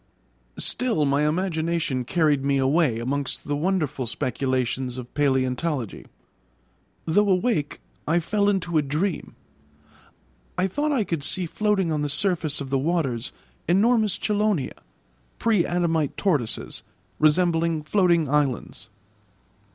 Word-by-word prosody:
Still 230 -12 +1
my 145 +2 +2
imagination 160 -5 -1
carried 150 -2 +2
me 140 0 +2
away 135 -2 +2
amongst 135 +3 -3
the 145 - 0
wonderful 150 -6 -1
speculations 130 +1 -1
of 125 -1 -8
palæontology. 130 - -1 1.0
Though 200 +5 +3
awake 185 -5 0 0.3
I 165 +3 +3
fell 205 +4 +1
into 175 -5 +1
a - - +3
dream. 150 +5 -2 1.2
I 180 - +2
thought 290 +11 -1
I 260 -7 +2
could 165 -6 -3
see 180 +6 -2
floating 195 -1 0
on 150 -1 0
the 145 - -1
surface 165 -3 0
of 135 -2 -6
the 135 - +2
waters 135 -6 -1 0.4
enormous 210 +2 +3
chelonia, 210 -9 0 0.6
pre 215 -7 +2
adamite 165 -4 0
tortoises, 145 - -1 0.4
resembling 165 0 +2
floating 170 -2 +2
islands. 140 -5 -1
160 Hz, 120 wpm, -24 LUFS, 140-185 Hz, 1.2 s, Though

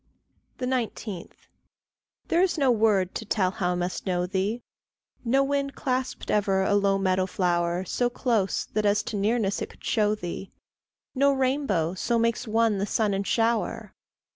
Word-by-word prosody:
19. 240 -7 -3 1.0
There 340 - +3
is 365 -2 +2
no 275 -4 +3
word 210 -5 +2
to - - -4
tell 195 -3 +1
how 180 -1 -1
I - - -2
must 180 +2 -3
know 180 -1 +1
thee; 195 +6 -2 0.6
No 265 +3 +3
wind 280 0 -1
clasped 260 -2 -2
ever 195 -2 +2
a 200 - +1
low 200 -1 +3
meadow 185 -1 +1
flower 175 -1 0
So 245 +6 0
close 230 -6 0
that 215 - +1
as 205 +1 +2
to 215 - -5
nearness 205 0 0
it - - -3
could - - -18
show 210 -1 +2
thee; 185 0 -6 0.6
No 280 +1 +4
rainbow 260 - 0
so 235 +5 0
makes 230 +1 0
one 220 -2 +2
the 200 - -1
sun 210 -1 +1
and 195 0 -2
shower. 230 0 0
210 Hz, 165 wpm, -26 LUFS, 190-245 Hz, 1.0 s, No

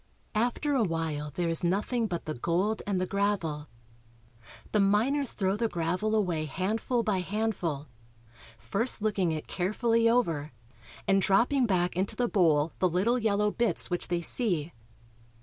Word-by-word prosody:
After 245 +6 0
a 265 - +2
while 160 -6 -2
there 175 +4 -2
is 165 0 +3
nothing 210 +6 0
but 175 -4 -4
the 155 - -3
gold 180 - -1
and 195 -3 0
the 185 - 0
gravel. 185 -7 -1 1.0
The 210 - +2
miners 230 +8 +2
throw 195 -2 0
the 230 +2 0
gravel 180 +6 -1
away 175 -7 0
handful 220 - -1
by 205 -4 0
handful, 180 -7 -2 0.7
first 205 - -1
looking 195 -5 +1
it 155 -1 -4
carefully 230 +5 +1
over 165 - 0 0.5
and 195 0 +3
dropping 240 +7 +3
back 180 -3 0
into 190 +2 -1
the 245 - 0
bowl 160 -7 +2
the 185 - +3
little 205 +9 +1
yellow 210 -2 +1
bits 235 -4 0
which 175 - -1
they 175 -1 -1
see. 175 - +2
195 Hz, 150 wpm, -28 LUFS, 170-220 Hz, 1.0 s, is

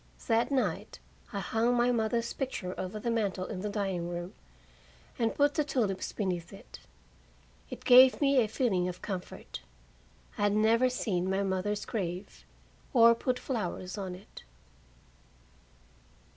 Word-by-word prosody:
That 230 0 +2
night 215 - -1 0.3
I 200 - -3
hung 225 +5 +1
my 240 +1 +3
mother's 230 0 0
picture 250 -9 -4
over 190 +3 -5
the 235 +2 -2
mantel 200 -5 -1
in 185 - -5
the 210 - -3
dining 195 -4 -2
room, 175 +1 -5 0.9
and 225 -1 +1
put 285 0 +3
the 305 - +1
tulips 230 -10 -1
beneath 180 -4 -3
it. 195 - -12 0.9
It - - -9
gave 255 +1 +8
me 275 -2 +4
a 225 - +3
feeling 210 -6 0
of 180 - -9
comfort; 185 -3 -6 0.8
I - - -1
had 205 0 +3
never 230 +4 +4
seen 190 -7 -1
my 195 +1 +1
mother's 195 +2 -1
grave, 185 -2 -5 0.5
or 235 -2 +7
put 250 +2 -1
flowers 190 -7 -4
on 190 -3 -5
it. 185 - -13
210 Hz, 145 wpm, -30 LUFS, 185-240 Hz, 0.9 s, gave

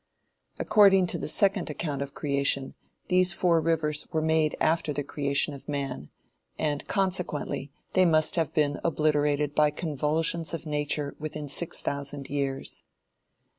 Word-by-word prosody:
According 195 -3 +5
to 170 - -3
the - - -4
second 195 +2 +3
account 150 -2 -3
of 140 0 -6
creation, 140 -2 0 0.3
these 185 0 +4
four 170 -2 +3
rivers 155 -2 0
were 160 - 0
made 160 -1 +1
after 160 -1 +1
the 145 +1 -2
creation 140 +1 0
of 140 +1 -11
man, 135 - -4 0.5
and 145 -2 -2
consequently 180 -7 -1 0.2
they 185 - +4
must 155 -2 +3
have 165 -3 0
been 145 -2 0
obliterated 150 -2 +1
by 150 0 +4
convulsions 160 +2 -1
of 165 - -8
Nature 145 -1 -1
within 155 -1 -5
six 160 +4 -1
thousand 140 -1 -4
years. 140 -1 -3
150 Hz, 140 wpm, -27 LUFS, 145-165 Hz, 0.5 s, According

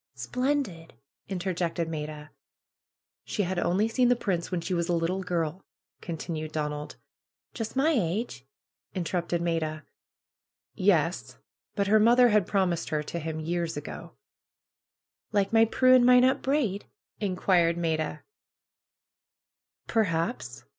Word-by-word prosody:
Splendid!" 250 - -2 0.3
interjected 175 -3 -2
Maida. 150 -1 -6 1.0
^'She 205 - -1
had 180 0 -2
only 185 +6 +2
seen 245 +2 +2
the 245 - +5
Prince 185 -7 -2
when 180 - -1
she 170 +3 -3
was 170 0 -1
a - - +2
little 170 +3 -1
girl," 175 -1 -2 0.4
continued 160 -2 -5
Donald. 150 -1 -4 0.6
^'Just 225 0 -5
my 285 +5 +3
age?" 195 - -1 0.5
interrupted 175 -1 -1
Maida. 160 -2 -1 0.9
'^Yesl - - +1 0.4
But 200 - +1
her 215 +2 +4
mother 240 +3 +6
had 210 -4 +3
promised 185 -4 0
her 150 -1 -1
to 170 - -5
him 160 0 -4
years 170 0 -2
ago." 145 - -8 1.2
^'Like 200 0 +1
my 225 0 +6
Prue 255 +3 +4
and 255 -1 +7
Minot 250 +1 +5
Braid?" 260 -8 0 0.3
inquired 180 -4 +2
Maida. 160 -2 -2 1.6
Perhaps 190 -2 -1
180 Hz, 120 wpm, -28 LUFS, 165-215 Hz, 1.6 s, and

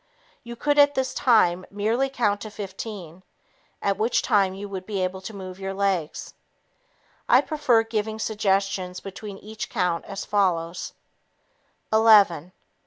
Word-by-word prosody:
You 235 0 -9
could 290 +4 +1
at 285 0 +6
this 260 0 -1
time 185 -7 +3
merely 225 +7 0
continue - - -20
to - - -20
count 205 - -5
to 215 - -6
15, 195 -3 -8 0.6
at 200 -1 +1
which 225 +3 +1
time 195 -2 +2
you 200 +1 -6
would 190 -2 -7
be 205 -3 -3
able 185 +1 -3
to 190 - -7
move 185 -1 -8
your 195 0 -4
legs. 190 -6 -2 1.0
I - - +7
prefer 290 -8 +2
giving 220 -1 -3
suggestions 195 -4 -1
between 195 +1 -8
each 215 +2 -7
count 175 -2 -1
as 195 0 -6
follows: 180 -4 0 1.0
"Eleven 205 -7 +5
200 Hz, 150 wpm, -24 LUFS, 185-220 Hz, 1.0 s, I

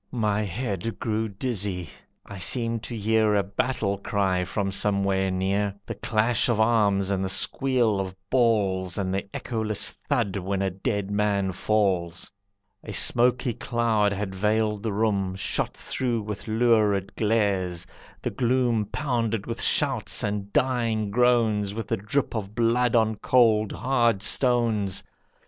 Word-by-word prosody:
My 105 -3 0
head 105 +1 -3
grew 110 -1 -2
dizzy, 100 -5 -3 0.4
I 100 -1 -9
seemed 115 +5 +1
to 120 - -6
hear 110 0 +2
A 100 - +2
battle 100 0 -1
cry 95 -3 0
from 95 +2 -2
somewhere 100 -1 +1
near, 95 +2 -1
The - - -5
clash 110 +2 +1
of 115 -2 +1
arms, 105 -4 +2
and 95 -1 0
the 95 - -2
squeal 120 -1 +1
of 95 -1 -4 0.2
balls, 100 -7 +1
And 95 -2 -1
the 100 +1 -3
echoless 110 -3 -1
thud 115 -9 -2
when 95 +1 -2
a 95 - 0
dead 100 +1 -3
man 100 -2 +1
falls. 95 -3 -1 0.5
A 105 - -7
smoky 125 +2 +3
cloud 115 -4 0
had 100 -1 -3
veiled 105 +1 0
the 110 0 -2
room, 100 -3 0
Shot 95 - -2
through 120 -4 -2
with 105 0 -6
lurid 110 -4 +2
glares; 100 -6 0 0.4
the - - -1
gloom 120 -3 +1
Pounded 115 -3 -2
with 115 0 -4
shouts - - +1
and 100 -1 -3
dying 115 -5 0
groans, 110 -4 +2
With 115 -2 -4
the - - -1
drip 110 +8 -1
of 105 -2 -5
blood 120 +1 +2
on 110 -2 +2
cold, 110 -3 +3
hard 120 -4 +1
stones. 115 -7 +2
105 Hz, 145 wpm, -25 LUFS, 100-115 Hz, 0.5 s, smoky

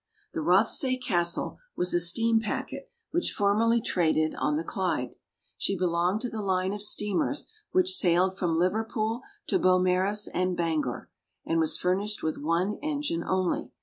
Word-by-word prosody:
The - - -2
Rothsay 260 -4 +3
Castle 175 -9 -1 0.2
was 180 0 +1
a 175 - +3
steam 225 +7 +3
packet 220 - -4 0.2
which 345 +2 0
formerly 225 +3 +2
traded 155 -6 +1
on 150 0 0
the 160 - -2
Clyde. 165 -9 -2 0.5
She 195 - 0
belonged 180 +3 0
to 245 - -2
the 220 - -4
line 190 -1 0
of 205 - -5
steamers 210 +6 0 0.2
which 370 +1 +3
sailed 185 - +3
from 170 -4 -1
Liverpool 220 +5 -1 0.2
to 375 - +1
Beaumaris 185 - +2
and 180 0 0
Bangor, 160 -7 -2 0.3
and 165 - 0
was 160 -1 +1
furnished 195 +4 0
with 155 - -2
one 170 +7 0
engine 290 - -2
only. 185 -1 -1
185 Hz, 150 wpm, -27 LUFS, 170-220 Hz, 0.5 s, Rothsay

